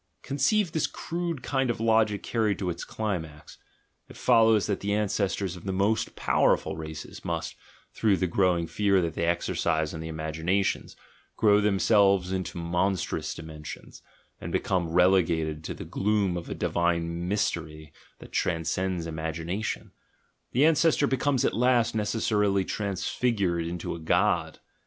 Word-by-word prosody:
Conceive 165 +7 +1
this 160 - 0
crude 170 -5 -4
kind 135 -2 0
of 120 - -1
logic 110 -2 +2
carried 110 -4 0
to 90 -3 -2
its 85 - -6
climax: 80 -9 -5 0.5
it - - -12
follows 110 -2 +4
that 100 -2 -1
the 100 +1 -1
ancestors 100 -3 -1
of 90 - -12
the 95 - -1
most 100 +3 0
powerful - - +2
races 80 0 -8
must, - - -3 0.4
through 105 -4 +2
the 95 - 0
growing 90 -1 +2
fear 100 +2 +2
that 85 -3 -1
they 85 - -1
exercise 80 -2 0
on 80 - -6
the 80 0 -5
imagi 80 0 -5
nations, 95 +3 0 0.4
grow 105 -2 +5
themselves 100 -2 +3
into 95 -2 -3
monstrous 90 +2 -1
dimensions, 80 -2 -9 0.4
and - - -6
become 90 -3 0
relegated 85 -3 +2
to - - -5
the - - -8
gloom 100 -3 0
of 85 - -5
a - - -4
divine 85 0 -1
mystery 80 -6 -2 0.2
that - - -13
transcends 85 +1 -1
imagination 80 +5 -4 0.3
— - - -44
the 135 +5 +4
ancestor 160 -1 +4
becomes 135 -1 +1
at - - +1
last 125 -1 +2
necessarily 105 -2 +1
transfigured 100 -3 -1
into 85 0 -4
a 85 - -6
god. 80 - +1
95 Hz, 145 wpm, -27 LUFS, 85-110 Hz, 0.5 s, grow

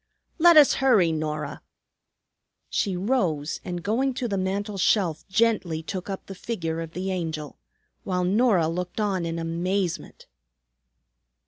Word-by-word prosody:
"Let 340 0 +7
us 295 -2 +8
hurry, 215 -11 +4
Norah." 150 -2 -3 1.1
She 195 -4 0
rose, 180 - -1
and 175 -1 -5
going 250 +5 0
to 245 - -2
the 200 - -2
mantel 195 +2 -2
shelf 180 -4 +1
gently 190 -6 +1
took 185 +3 -5
up 195 - -5
the 195 - -8
figure 165 -6 -4
of 165 0 -7
the 190 +2 -3
Angel, 160 -5 -4 0.4
while 180 -1 -1
Norah 195 -3 +3
looked 180 +5 -4
on 195 -5 0
in 165 0 -3
amazement. 170 +2 -2
185 Hz, 135 wpm, -25 LUFS, 165-210 Hz, 1.1 s, us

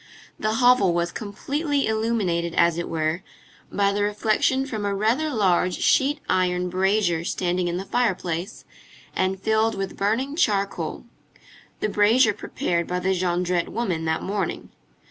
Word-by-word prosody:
The 215 0 0
hovel 235 -7 +4
was 170 0 0
completely 280 +7 -2
illuminated, 215 -7 -1
as 170 0 +3
it 170 - -4
were, 160 +2 -1 0.5
by 200 0 +1
the 205 - -1
reflection 215 +5 +1
from 220 -6 -4
a 200 -1 -1
rather 235 +10 +1
large 185 -7 +2
sheet 285 +2 +2
iron 180 -1 +1
brazier 185 -2 +1
standing 180 0 -1
in 175 0 -2
the 190 - -5
fireplace, 190 -5 -2 0.5
and 190 0 0
filled 220 +2 +1
with 195 -1 -4
burning 235 +8 0
charcoal, 200 - -1 0.8
the - - +1
brazier 210 +3 +4
prepared 170 -3 -2
by 180 - -2
the 185 +1 0
Jondrette 180 -1 0
woman 180 -9 -2
that 160 0 -1
morning. 195 -3 -3
200 Hz, 145 wpm, -24 LUFS, 180-220 Hz, 0.8 s, hovel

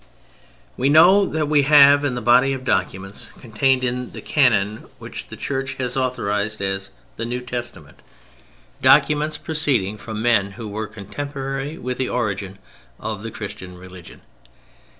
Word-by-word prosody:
We 135 +3 +1
know 180 +6 +6
that 155 -1 -1
we 150 -1 +4
have 145 0 +7
in 135 -3 -1
the 120 - -5
body 125 +4 +4
of 130 -1 -5
documents 95 -1 -2
contained 130 +3 +1
in 125 0 -2
the - - -8
"canon" 110 -7 +2
which - - -8
the - - -10
Church 135 -1 -3
has 125 -1 -3
authorized 110 -5 -1
as 95 0 -2 0.3
the 115 - -3
"New 125 +1 -3
Testament," 120 - -7 0.8
documents 150 0 +4
proceeding 130 - 0
from 110 -1 -6
men 110 -4 +2
who 110 +2 -8
were 105 +1 -4
contemporaries 135 - -5
with 125 0 -4
the 130 - -1
origin 100 -5 -3 0.4
of 110 -2 -5
the 115 - -5
Christian 95 -4 -8
religion. 90 -1 -13
120 Hz, 150 wpm, -21 LUFS, 105-135 Hz, 0.8 s, have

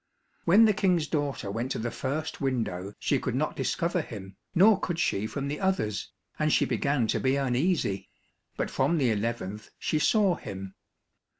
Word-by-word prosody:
When 205 +7 +7
the 215 - +4
King's 180 -5 +2
daughter 145 -10 -2
went 115 +5 -2
to - - -3
the 115 +1 -2
first 150 +4 -3
window 105 -8 -2
she - - +1
could - - -2
not - - 0
discover - - 0
him, 95 -1 -9 0.2
nor 195 +3 +6
could 175 -4 -2
she 105 -9 0
from 140 +4 -4
the 145 +1 -3
others, 190 - -1 0.3
and 155 0 +2
she - - +4
began 140 -4 +1
to - - 0
be 130 +1 +2
uneasy, 135 - 0 0.5
but - - -2
from 170 - +2
the 130 -6 +2
eleventh 105 -1 -3
she 155 - 0
saw 200 +2 +4
him. 95 - -7
135 Hz, 175 wpm, -28 LUFS, 105-165 Hz, 0.5 s, When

